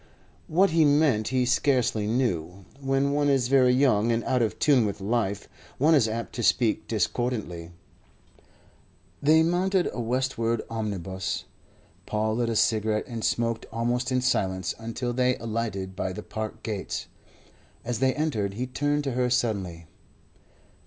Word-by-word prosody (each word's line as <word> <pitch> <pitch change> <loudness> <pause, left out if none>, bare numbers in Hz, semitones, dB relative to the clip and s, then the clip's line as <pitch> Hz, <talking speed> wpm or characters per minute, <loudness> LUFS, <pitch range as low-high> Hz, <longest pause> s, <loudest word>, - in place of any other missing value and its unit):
What 185 +3 +3
he 165 0 +4
meant 145 -7 +3
he 125 +2 +1
scarcely 125 -4 +1
knew. 95 -7 -1
When 135 0 +1
one 145 0 +2
is 130 -3 +2
very 130 -2 +5
young 125 -4 +3
and 115 0 0
out 130 -2 +1
of 110 - 0
tune 140 -5 +4
with 100 0 -4
life, 100 -1 -1 0.3
one 155 +7 +4
is 135 -8 +4
apt 115 +1 -4
to 120 - -4
speak 115 +1 +2
discordantly. 105 -5 -2 1.5
They 160 +2 +5
mounted 180 +2 +1
a - - -5
westward 115 -1 -1
omnibus. 95 -4 -3 0.6
Paul 110 +1 0
lit 120 -1 0
a 115 - -1
cigarette 110 -1 +1
and 115 -3 -6
smoked 115 0 -1
almost 120 +3 -1
in 130 0 +1
silence 95 -8 0
until 115 +2 -4
they 125 0 +2
alighted 110 -4 -4
by 95 -1 -3
the 105 - -7
Park 110 0 -6
gates. 105 -3 -4 0.8
As 120 -1 -2
they 130 -1 +2
entered, 110 -11 -1
he 125 +4 -2
turned 145 +3 -1
to 135 - -2
her 125 0 0
suddenly. 100 -9 -1
115 Hz, 150 wpm, -26 LUFS, 105-130 Hz, 1.5 s, very